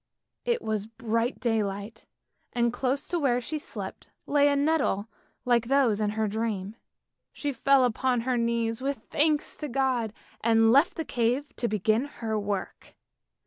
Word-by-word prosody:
It 475 -1 0
was 215 -1 -2
bright 230 +1 -1
day 225 -3 +1
light, 205 +3 -6 0.5
and 235 -1 +1
close 265 +2 -1
to 345 - 0
where 255 -5 +2
she 300 +6 -4
slept - - -8 0.2
lay 285 0 +4
a 285 - +3
nettle 280 -8 +1 0.4
like 240 -2 +3
those 255 -6 +3
in 210 - +1
her 220 -1 +1
dream. 210 -1 -2 0.6
She 290 -1 -3
fell 265 +1 +4
upon 250 +1 +1
her 255 +1 0
knees 230 0 0
with 275 +1 -1
thanks 300 0 +1
to 300 - -4
God 255 -4 0 0.3
and 225 0 +5
left 280 +6 +4
the 325 - -3
cave 245 +4 -1
to 240 - 0
begin 215 +4 +1
her 225 -6 -3
work. 200 -2 -4
235 Hz, 160 wpm, -27 LUFS, 220-275 Hz, 0.6 s, and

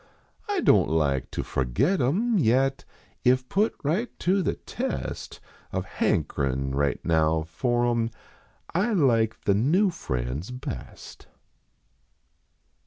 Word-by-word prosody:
I 400 -3 +1
don 95 - +5
t - - -2
like 70 -4 +1
to - - -3
forget 115 - 0
em, 200 - +2
vet 135 +1 +2 0.4
If 130 0 +3
put 210 - +1
right 180 +12 0
to 190 +2 +1
the - - 0
test 65 - -5 0.3
Of - - -2
hankerin 70 0 -1
right 70 0 0
now 80 -1 +2
for 120 +10 0
em 115 -1 +1 0.6
I 205 +7 +1
like 115 - +2
the 100 - +2
new 165 - +3
friends 65 - -4
best. 125 0 -8
120 Hz, 120 wpm, -26 LUFS, -, 0.6 s, don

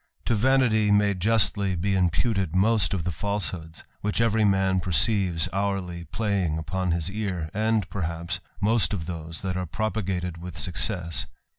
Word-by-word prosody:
To - - +1
vanity 115 -2 +3
may 105 0 +4
justly 100 -1 +2
be 95 +3 0
imputed 95 0 +1
most 100 -1 +3
of 85 - -2
the 90 - -2
falsehoods, 80 -1 -3 0.2
»hicli 105 +1 0
every 110 -1 +3
man 95 -2 +2
perceives 90 0 +2
hourly 95 -3 -2
playing 100 -8 -1
upon 90 +4 -2
his 85 +1 0
ear, 95 -7 -3
and, 110 -1 +1
lerhapE, 85 -1 -3 0.2
most 105 -4 +2
of 85 -5 -3
those 80 -1 -6
that 95 -1 -2
are 90 -1 -2
propagated 95 -3 -2
with 85 -2 -8
success. 90 0 0
95 Hz, 150 wpm, -26 LUFS, 85-105 Hz, 0.2 s, may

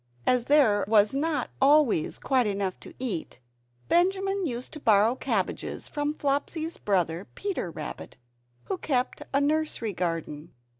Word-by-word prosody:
As 250 -2 +2
there 250 -9 +4
was 210 +1 +4
not 300 +3 -1
always 275 - +4
quite 255 -4 +1
enough 195 -2 -2
to - - -12
eat, 220 - -4 0.5
Benjamin 385 +1 +2
used 245 -1 -5
to 305 - -7
borrow 220 -2 +4
cabbages 230 -7 -2
from 295 0 -2
Flopsy's 310 +4 -2
brother, 180 -2 0
Peter 395 - -3
Rabbit, 165 - -7 0.5
who 380 - -4
kept 255 -3 -1
a 275 - +3
nursery 290 -7 0
garden. 165 -3 -4
255 Hz, 135 wpm, -27 LUFS, 200-300 Hz, 0.5 s, there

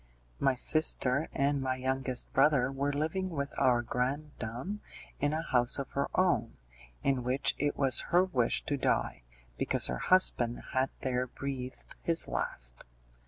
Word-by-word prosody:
My 135 -1 +2
sister 140 0 +1
and 140 0 +1
my 130 -1 0
youngest 130 0 -2
brother 135 -2 +4
were 140 +1 -1
living 160 +6 -1
with 140 -3 -4
our 120 -2 +3
grandam 130 - -3 0.4
in 145 +1 +1
a 160 +1 -2
house 125 -6 +3
of 140 -2 -5
her 140 - -1
own, 145 -12 +2 0.5
in 135 -3 +1
which 130 +3 +1
it 145 0 0
was 135 -3 +4
her 175 +1 +5
wish 130 -11 0
to 145 - -1
die, 65 - 0 0.4
because - - +2
her 65 -1 0
husband 120 -10 +3
had 130 +1 +2
there 125 -1 -1
breathed 130 0 -6
his 165 -1 +1
last. - - -4
135 Hz, 150 wpm, -31 LUFS, 125-145 Hz, 0.5 s, her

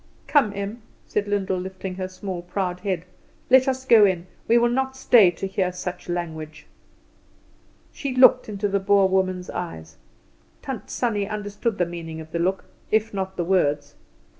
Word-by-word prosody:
"Come, 275 -9 +3
Em," 200 +4 -5 0.2
said 205 0 -2
Lyndall, 195 -2 0
lifting 190 0 -6
her 185 0 -4
small 185 -1 -6
proud 180 0 -3
head, 185 -3 -2 0.5
"let 260 +1 +6
us 260 0 -1
go 230 -5 +7
in. 185 -3 +2 0.2
We 235 - +5
will 240 0 +3
not 265 +1 -1
stay 235 -7 +6
to 175 +2 -5
hear 190 -1 -1
such 180 0 -6
language." 160 -3 -5 1.3
She 275 -3 -4
looked 255 -2 +6
into 205 0 -2
the 200 0 0
Boer 195 0 +4
woman's 185 -1 0
eyes. 80 - -6 0.7
Tant 250 -7 -6
Sannie 210 -5 -1
understood 210 +1 -3
the 175 - +2
meaning 165 -2 -7
of 160 0 -10
the 170 - -2
look 185 +3 0 0.2
if 220 0 +1
not 190 -1 -4
the 175 - -1
words. 145 -6 +1
190 Hz, 165 wpm, -24 LUFS, 180-215 Hz, 1.3 s, go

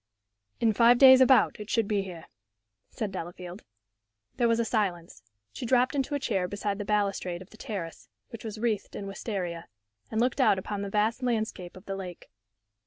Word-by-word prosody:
"In 225 -2 +3
five 235 +3 +6
days, 260 0 +9
about, 260 -3 +5
it 210 0 -8
should 230 -5 +1
be 205 -1 +1
here," 180 -4 -8 0.6
said 215 -3 -4
Delafield. 180 +1 -7 0.8
There 240 - +3
was 230 0 +2
a 235 - +1
silence. 185 - -2 0.3
She - - -7
dropped 250 +1 +2
into 285 +1 -1
a - - -1
chair 195 -8 -1
beside 205 +1 -3
the 205 - -4
balustrade 200 -4 -1
of 185 - -23
the - - -14
terrace, 185 -8 -6 0.2
which 230 -3 -9
was 220 -1 -6
wreathed 215 -3 -2
in 200 - -5
wistaria, 190 -4 -4 0.4
and 220 - -2
looked 250 +3 +1
out 200 - +4
upon 200 +2 -4
the 200 - -4
vast 215 +4 0
landscape 220 -7 -2
of 185 - -14
the 195 - -4
lake. 180 -3 -8
210 Hz, 185 wpm, -28 LUFS, 190-235 Hz, 0.8 s, days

